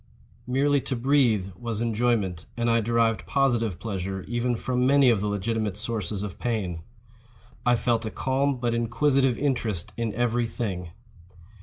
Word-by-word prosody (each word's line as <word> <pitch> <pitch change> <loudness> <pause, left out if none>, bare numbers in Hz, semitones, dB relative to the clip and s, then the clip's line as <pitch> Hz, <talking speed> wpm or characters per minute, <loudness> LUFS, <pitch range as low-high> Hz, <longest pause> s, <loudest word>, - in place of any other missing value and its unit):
Merely 140 +2 +2
to 130 - -2
breathe 120 -6 +2
was 115 -3 -4
enjoyment; 115 -6 0
and 120 0 +1
I 115 0 +3
derived 115 0 +1
positive 120 -9 +1
pleasure 95 -3 -4
even 120 +1 -1
from 125 +2 0
many 140 -2 +6
of 105 -4 +1
the 105 - -1
legitimate 105 0 -1
sources 105 -3 -2
of 100 -3 -6
pain. 100 -9 -2 0.9
I 120 - +5
felt 115 -1 0
a - - -2
calm 135 +3 0
but 120 -1 -1
inquisitive 125 +2 +2
interest 115 -10 -1
in 115 -2 -1
every 120 0 +1
thing. 95 -7 -4
115 Hz, 150 wpm, -26 LUFS, 105-125 Hz, 0.9 s, many